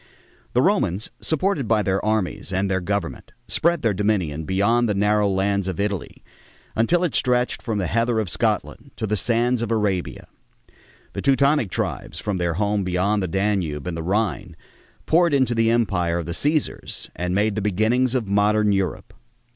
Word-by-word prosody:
The - - +3
Romans, 95 +6 0
supported 160 - 0
by 110 -1 +2
their 95 0 0
armies 110 -4 -1
and 95 +1 0
their 95 -1 0
government, 100 -1 -4
spread 170 -2 +1
their 110 -3 +2
dominion 90 -7 -1
beyond 110 +6 +2
the 105 - 0
narrow 105 +1 +2
lands 100 0 0
of 95 -3 -4
Italy 100 -2 -3 0.5
until 165 +11 +2
it 175 - 0
stretched 125 0 +1
from 110 -3 -2
the 95 - -1
heather 115 +5 +1
of 110 - -1
Scotland 85 - -2
to 110 - -3
the 105 0 0
sands 120 +3 +1
of 115 - -2
Arabia. 105 -5 -1 0.9
The - - -4
Teutonic 140 -3 +3
tribes, - - -4
from 105 -3 -2
their 85 -2 -1
home 105 +1 0
beyond 95 +3 0
the 95 - -1
Danube 95 -6 -1
and 90 -2 -3
the 85 - -4
Rhine, 100 0 -1 0.5
poured 170 -2 +3
into 130 -3 +2
the 115 -1 +2
empire 95 -8 +1
of 85 - -3
the 85 - -5
Cæsars 150 - -2
and 90 +1 -2
made 105 +1 +2
the 105 - -2
beginnings 110 +6 +1
of 125 -4 0
modern 105 +1 +2
Europe. 95 -2 -2
105 Hz, 175 wpm, -22 LUFS, 95-115 Hz, 0.9 s, The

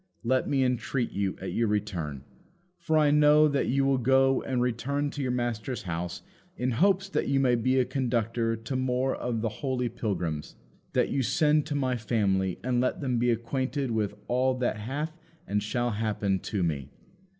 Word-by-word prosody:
Let 130 +2 +1
me 135 -2 +2
entreat 125 0 -1
you, 100 -1 -2
at 95 - -5
your 115 - +1
return 90 -10 -2 0.6
(for 160 -2 +1
I 150 -2 +4
know 150 +1 +6
that 140 -2 0
you 135 +1 +2
will 135 -1 +2
go 135 +1 +3
and 130 -2 -2
return 130 +4 -1
to 145 - -5
your 130 - -1
master's 120 -1 -2
house 85 0 -4 0.3
in 125 +1 0
hopes 190 - +2
that - - -1
you 140 0 +2
may 130 -2 +3
be 130 +2 +2
a 130 - +3
conductor 115 -3 0
to 115 +4 -5
more 130 +1 0
of 120 -2 -2
the 115 - 0
holy 130 -3 -1
pilgrims), 90 -10 -3 0.4
that - - +2
you 135 - 0
send 150 +3 +2
to 150 - -2
my 130 -3 0
family 100 -5 0
and 125 0 +1
let 125 - 0
them 125 -4 0
be 120 +1 +2
acquainted 125 +3 -1
with 105 -2 -1
all 130 +1 +2
that 125 -3 0
hath 145 +9 -4 0.3
and 105 +1 0
shall 120 +3 -1
happen 105 -3 0
to 95 +1 -2
me. 70 -5 -2
125 Hz, 185 wpm, -28 LUFS, 110-135 Hz, 0.6 s, know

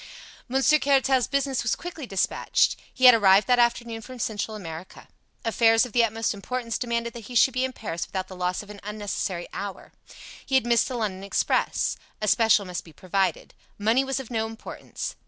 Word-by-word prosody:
Monsieur 270 +4 +4
Caratal's 270 -3 +2
business 275 -2 0
was 225 - 0
quickly 330 -6 -7
dispatched. 195 -3 +1 0.2
He 260 - +1
had 250 - +11
arrived 200 -2 +5
that 250 -1 +3
afternoon 235 -1 +1
from 255 +3 -10
Central 220 -1 -3
America. 165 -2 -9 0.4
Affairs 225 0 +4
of 250 - -9
the 240 - +4
utmost 225 0 0
importance 230 +3 -4
demanded 235 -1 -2
that 230 -3 -9
he 245 - -9
should 250 +2 +5
be 255 +1 0
in 260 - -1
Paris 185 -9 -5
without 185 -1 -4
the 190 - -10
loss 180 +2 -2
of 210 - -12
an 205 - -11
unnecessary 205 -4 -4
hour. 200 -1 -6 0.5
He 270 - -2
had 260 - +4
missed 235 -1 +3
the 260 - -4
London 200 -5 -3
express. 200 - 0 0.2
A 215 - -2
special 220 -1 +4
must 180 -1 -5
be 165 - -15
provided. 190 +4 -1 0.2
Money 225 +6 +2
was 270 0 -2
of 255 -3 -9
no 220 -1 -1
importance. 225 0 -7
225 Hz, 190 wpm, -25 LUFS, 200-250 Hz, 0.5 s, had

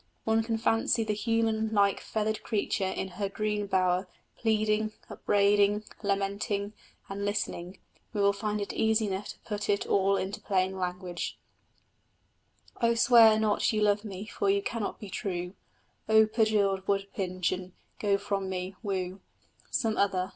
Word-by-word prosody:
One 225 0 +2
can 225 0 -1
fancy 225 +1 +2
the 215 -1 -1
human 220 0 0
like 200 -2 +3
feathered 215 0 -2
creature 200 -2 -1
in 190 - -3
her 200 - 0
green 210 0 -2
bower, 185 -1 +1 0.3
pleading, 215 -1 +1 0.2
upbraiding, 205 +1 +3 0.2
lamenting; 200 0 -1 0.3
and, 200 +1 -5
listening, 200 -3 -3 0.3
we 210 - -4
will 200 0 +4
find 210 +1 -2
it 200 - -4
easy 220 0 +2
enough 195 0 -3
to - - -9
put 210 -2 -4
it 200 -1 +1
all 195 0 +2
into 195 +2 -4
plain 190 -1 0
language: 180 -1 -4 1.4
O 235 0 +3
swear 230 -2 +7
not 215 -1 +2
you 215 -1 +1
love 205 0 +2
me, 200 -1 -6
for 200 -2 -1
you 200 0 +2
cannot 230 -3 -3
be 205 -3 -9
true, 180 -2 -3 0.6
O 220 0 +7
perjured 210 -3 +1
wood 195 -1 +1
pigeon! 185 -1 -2 0.3
Go 200 -2 +2
from 195 -1 -2
me 185 0 -4
woo 190 -3 -3 0.5
Some 220 -2 0
other! 190 -2 +1
205 Hz, 150 wpm, -29 LUFS, 195-215 Hz, 1.4 s, swear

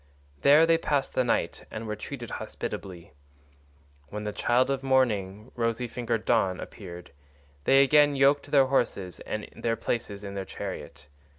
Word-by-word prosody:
There 150 +3 +7
they 165 0 +3
passed 145 -4 0
the 130 - +2
night 120 - -1
and 115 - -6
were 105 -1 -3
treated 120 +1 -7
hospitably. 90 -5 -7 0.9
When 105 +6 -6
the 105 0 -3
child 125 +5 +2
of 135 -1 -1
morning, 110 -6 0
rosy 115 +1 -1
fingered 115 -1 -3
Dawn, 95 -6 +2
appeared, 90 -3 -9 0.5
they 135 0 +6
again 145 +1 +5
yoked 140 +1 +3
their 140 -2 +5
horses 100 - -1
and 110 0 -5
their 115 -1 -1
places 105 -3 -3
in 100 -1 -6
the 100 -1 -3
chariot. - - -7
115 Hz, 155 wpm, -27 LUFS, 105-135 Hz, 0.9 s, There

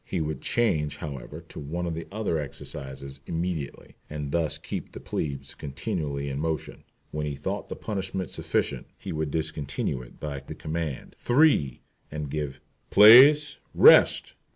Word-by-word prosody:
He 90 - -3
would 80 -1 -3
change, 85 -11 +1
however, 75 +2 -7
to - - -8
one 80 +5 -4
of 85 - -2
the 85 +1 -6
other 100 -6 -1
exercises 70 -1 -7
immediately, 85 -3 -4
and 75 -2 -5
thus 85 -1 0
keep - - -6
the - - -7
plebes 70 -3 -4
continually 75 -1 -4
in 70 0 -3
motion. 80 0 -3 0.3
When 75 0 -3
he 70 - -3
thought 95 +9 -4
the - - -4
punishment 95 -3 -4
sufficient - - -2
he - - -7
would 80 -1 -2
discontinue 75 -4 -2
it 60 - -14
by 75 -2 -4
the 70 - -9
command, 80 -3 -4
"three," 120 - +3 0.3
and 75 -2 -5
give 75 -3 -3 0.3
"place, 135 +8 +8 0.2
rest." - - +7
75 Hz, 150 wpm, -26 LUFS, 70-90 Hz, 0.3 s, place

